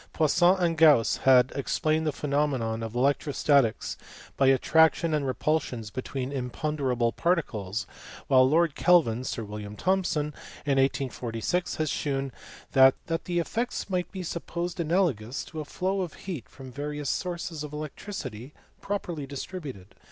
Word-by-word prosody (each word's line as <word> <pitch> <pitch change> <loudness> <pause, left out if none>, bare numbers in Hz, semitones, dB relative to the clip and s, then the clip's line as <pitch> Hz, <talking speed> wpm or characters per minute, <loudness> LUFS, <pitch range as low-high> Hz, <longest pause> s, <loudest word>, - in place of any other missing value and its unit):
Poisson 175 +4 +4
and 170 -3 0
Gauss 150 -8 +6
had 130 -1 +6
explained 155 +3 0
the - - +2
phenomena 140 -3 0 0.2
of 115 +1 -6
electrostatics 140 -2 +2 0.4
by 135 - +3
attractions 160 +5 +4
and 145 -3 0
repulsions 130 -4 -1
between 130 +1 -4
imponderable 130 -2 -1
particles; 115 - -1 0.4
while 130 -1 +5
Lord 165 0 +3
Kelvin 150 -11 +3
(Sir 115 - -3
William 105 0 -7
Thomson) 165 - 0 0.3
in 140 -2 +2
1846 135 - -1
had 155 - -1
shewn 135 -2 -2 0.4
that 130 0 +7 0.3
the 175 -1 -2
effects 225 +5 -2
might 180 -1 -1
be 190 -2 -5
supposed 175 +1 -4
analogous 155 - 0
to 160 - -8
a 155 - -4
flow 190 +5 -1
of 175 -4 -5
heat 170 - -7
from 130 -2 -11
various 145 +2 -4
sources 170 -4 -3
of 150 - -7
electricity 150 - -7 0.3
properly 175 -8 -3
distributed. 135 - -7
145 Hz, 135 wpm, -27 LUFS, 130-170 Hz, 0.4 s, that